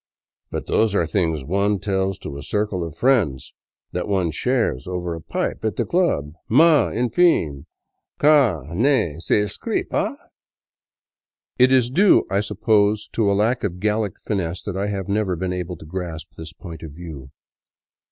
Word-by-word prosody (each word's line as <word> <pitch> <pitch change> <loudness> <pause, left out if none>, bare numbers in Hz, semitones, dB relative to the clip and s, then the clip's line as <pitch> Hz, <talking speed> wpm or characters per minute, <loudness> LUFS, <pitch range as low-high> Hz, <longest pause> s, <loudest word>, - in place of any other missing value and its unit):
But - - -4
those 110 -2 +1
are 85 - +2
things 80 -3 -1
one 100 +5 +1
tells 95 -1 -1
to 75 -6 -8
a 70 - -6
circle 105 -2 -1
of 80 -3 -6
friends, 110 - +1 0.4
that - - -3
one 95 -5 0
shares 115 - -1
over 90 -2 -3
a 80 - -7
pipe - - -3
at 110 -4 -1
the - - -1
club, 125 - 0 0.2
mais, 150 +1 +5
enfin, 115 - +2 0.5
ga 140 - +4
ne 110 - +1
s'ecrit 105 +3 -1
pas"! - - -1 1.4
It 130 +1 +6
is 125 -2 +3
due, 195 +8 +5
I 100 - +2
suppose, 105 0 +1
to 110 -3 +2
a 100 - +2
lack 115 +5 +1
of 90 -3 -3
Gallic 105 -1 -1
finesse 90 -4 -3
that 105 - -5
I 100 +2 -1
have 100 -2 -3
never 100 -2 0
been 90 +2 -3
able 90 -1 -4
to 80 - -12
grasp 85 -1 -6
this 80 0 -9
point 85 -3 -10
of 80 -3 -8
view. 75 -5 -9
100 Hz, 160 wpm, -22 LUFS, 85-110 Hz, 1.4 s, It